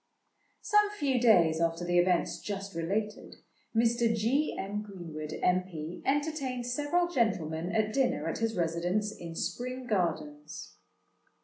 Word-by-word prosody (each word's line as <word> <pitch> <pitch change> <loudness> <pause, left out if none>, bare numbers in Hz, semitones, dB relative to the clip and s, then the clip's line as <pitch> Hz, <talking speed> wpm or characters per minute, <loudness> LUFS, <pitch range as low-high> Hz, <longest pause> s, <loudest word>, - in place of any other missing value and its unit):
Some 420 -1 +4
few 275 -6 +1
days 170 -9 +5
after 165 +1 0
the 175 0 +3
events 180 0 +1
just 200 -1 -5
related, 205 +6 -3 0.4
Mr. 235 0 +3
G. 250 +8 +1
M. 205 +2 -3
Greenwood, 165 -7 -7
M.P., 180 -3 -1
entertained 275 -3 0
several 295 +8 +1
gentlemen 175 - 0
at 215 0 +1
dinner 265 -1 +1
at - - -2
his 225 -2 -1
residence 175 +5 0
in 170 -5 -8
Spring 255 +7 -3
Gardens. 155 - -2
205 Hz, 125 wpm, -30 LUFS, 170-245 Hz, 0.4 s, days